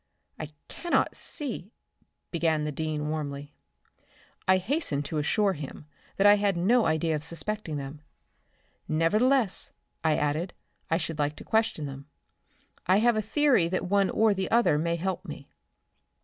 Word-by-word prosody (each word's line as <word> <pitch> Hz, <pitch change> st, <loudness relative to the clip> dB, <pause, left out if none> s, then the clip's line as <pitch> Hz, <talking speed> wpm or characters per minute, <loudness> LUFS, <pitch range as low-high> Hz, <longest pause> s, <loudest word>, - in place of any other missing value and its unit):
"I 150 Hz, -, -5 dB, 0.2 s
cannot 345 Hz, -, 0 dB
see" 235 Hz, -, -1 dB, 0.6 s
began 160 Hz, -3 st, +1 dB
the 150 Hz, -, -2 dB
dean 150 Hz, 0 st, -3 dB
warmly. 145 Hz, -2 st, -4 dB, 0.9 s
I 185 Hz, 0 st, +6 dB
hastened 185 Hz, -, -2 dB
to 155 Hz, +1 st, -2 dB
assure 200 Hz, +6 st, +2 dB
him 145 Hz, -1 st, -8 dB, 0.3 s
I 205 Hz, +1 st, +7 dB
had 200 Hz, -3 st, +1 dB
no 225 Hz, +7 st, +3 dB
idea 160 Hz, 0 st, +1 dB
of 150 Hz, -, -4 dB
suspecting 170 Hz, +1 st, -2 dB
them. 140 Hz, +2 st, -7 dB, 0.9 s
"Nevertheless," 215 Hz, -, +2 dB, 0.3 s
I 160 Hz, -1 st, +2 dB
added, 155 Hz, +5 st, -1 dB, 0.4 s
"I 165 Hz, -, +2 dB
should 160 Hz, -2 st, -4 dB
like 145 Hz, 0 st, 0 dB
to -, -, -10 dB
question 220 Hz, -9 st, 0 dB
them. 140 Hz, 0 st, -8 dB, 0.8 s
I 185 Hz, +2 st, +5 dB
have 235 Hz, +2 st, +3 dB
a 215 Hz, -, +1 dB
theory 245 Hz, -, +3 dB
that 185 Hz, +2 st, -2 dB
one 195 Hz, +1 st, +2 dB
or 220 Hz, -1 st, +3 dB
the 190 Hz, -1 st, -3 dB
other 230 Hz, -10 st, +3 dB
may 170 Hz, +1 st, 0 dB
help 185 Hz, +2 st, -3 dB
me." -, -, -10 dB
170 Hz, 150 wpm, -27 LUFS, 150-210 Hz, 0.9 s, I